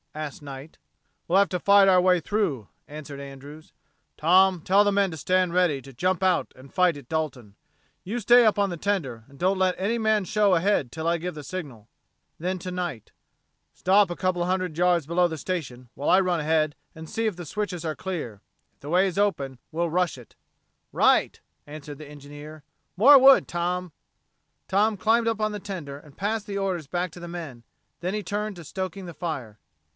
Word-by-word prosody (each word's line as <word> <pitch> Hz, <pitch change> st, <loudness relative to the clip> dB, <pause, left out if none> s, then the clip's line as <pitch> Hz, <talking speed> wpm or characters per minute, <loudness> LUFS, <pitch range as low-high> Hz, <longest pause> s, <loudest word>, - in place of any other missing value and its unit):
asked 155 Hz, -2 st, -6 dB
Knight. 140 Hz, +1 st, -10 dB, 0.5 s
"We'll 185 Hz, +3 st, +4 dB
have 200 Hz, -, +4 dB
to 180 Hz, -, -2 dB
fight 200 Hz, +1 st, +5 dB
our 185 Hz, -1 st, +5 dB
way 180 Hz, 0 st, +4 dB
through," 170 Hz, -, -2 dB, 0.2 s
answered 145 Hz, -1 st, -9 dB
Andrews. 140 Hz, +3 st, -11 dB, 0.5 s
"Tom, 185 Hz, +3 st, +4 dB
tell 195 Hz, +5 st, +4 dB
the 205 Hz, -, +2 dB
men 200 Hz, -2 st, +1 dB
to -, -, -6 dB
stand 180 Hz, +3 st, +1 dB
ready 175 Hz, -6 st, +2 dB
to 135 Hz, -, -13 dB
jump 180 Hz, +8 st, 0 dB
out 185 Hz, -2 st, +1 dB
and 130 Hz, +1 st, -16 dB
fight 180 Hz, -4 st, +3 dB
at 140 Hz, -4 st, -12 dB
Dalton. 130 Hz, -10 st, -4 dB, 0.5 s
You 225 Hz, +6 st, -3 dB
stay 240 Hz, +3 st, +6 dB
up 215 Hz, -1 st, +3 dB
on 200 Hz, -2 st, +1 dB
the 175 Hz, -, -5 dB
tender 155 Hz, -, -2 dB
and 140 Hz, -, -17 dB
don't 190 Hz, +1 st, +1 dB
let 185 Hz, -1 st, +2 dB
any 210 Hz, +5 st, -1 dB
man 220 Hz, -2 st, +1 dB
show 205 Hz, +1 st, +2 dB
a 175 Hz, -, +4 dB
head 190 Hz, -6 st, +1 dB
until 160 Hz, +6 st, -5 dB
I 170 Hz, 0 st, +2 dB
give 175 Hz, 0 st, -5 dB
the 150 Hz, -, -8 dB
signal." 135 Hz, -, -7 dB, 0.5 s
Then, 185 Hz, +3 st, -2 dB
to 180 Hz, +1 st, -6 dB
Knight: 175 Hz, -, -5 dB, 0.6 s
"Stop 195 Hz, +1 st, +3 dB
a 175 Hz, -, -4 dB
couple 185 Hz, -1 st, -1 dB
of 175 Hz, -, 0 dB
hundred 185 Hz, -3 st, -1 dB
yards 175 Hz, -3 st, +2 dB
below 175 Hz, +3 st, +2 dB
the 160 Hz, -, -5 dB
station 135 Hz, -7 st, -5 dB
while 145 Hz, -, -3 dB
I 185 Hz, -, +6 dB
run 180 Hz, -3 st, +1 dB
ahead 155 Hz, 0 st, +1 dB, 0.2 s
and 160 Hz, 0 st, -9 dB
see 225 Hz, -, -2 dB
if 205 Hz, -5 st, -3 dB
the 175 Hz, -, -7 dB
switches 180 Hz, -1 st, -4 dB
are 155 Hz, -1 st, -2 dB
clear. 150 Hz, -, -5 dB, 0.3 s
If -, -, -44 dB
the 145 Hz, -, -8 dB
way 185 Hz, +4 st, +3 dB
is 190 Hz, +1 st, -3 dB
open, 140 Hz, -11 st, -1 dB
we'll 170 Hz, +1 st, -1 dB
rush 180 Hz, -3 st, 0 dB
it." 120 Hz, -, -15 dB, 0.6 s
"Right," -, -, +3 dB, 0.3 s
answered 145 Hz, -1 st, -9 dB
the 155 Hz, -, -10 dB
engineer. 145 Hz, +1 st, -11 dB, 0.3 s
"More 275 Hz, +8 st, +8 dB
wood, 270 Hz, +1 st, +7 dB
Tom." 175 Hz, 0 st, -3 dB, 0.7 s
Tom 210 Hz, +2 st, +2 dB
climbed 225 Hz, +3 st, +2 dB
up 225 Hz, -1 st, 0 dB
on 215 Hz, 0 st, 0 dB
the 210 Hz, -, -4 dB
tender 180 Hz, -9 st, -7 dB
and 145 Hz, -2 st, -18 dB
passed 210 Hz, +2 st, -2 dB
the 200 Hz, -1 st, -4 dB
orders 185 Hz, -6 st, -2 dB
back 175 Hz, +3 st, -2 dB
to 175 Hz, -, -12 dB
the 175 Hz, -, -7 dB
men; 160 Hz, -9 st, -8 dB, 0.4 s
then 180 Hz, +2 st, -2 dB
he 210 Hz, -, -3 dB
turned 210 Hz, 0 st, -3 dB
to 170 Hz, -, -10 dB
stoking 190 Hz, +3 st, -5 dB
the 170 Hz, -, -8 dB
fire. 140 Hz, -10 st, -5 dB
175 Hz, 205 wpm, -25 LUFS, 150-195 Hz, 0.7 s, More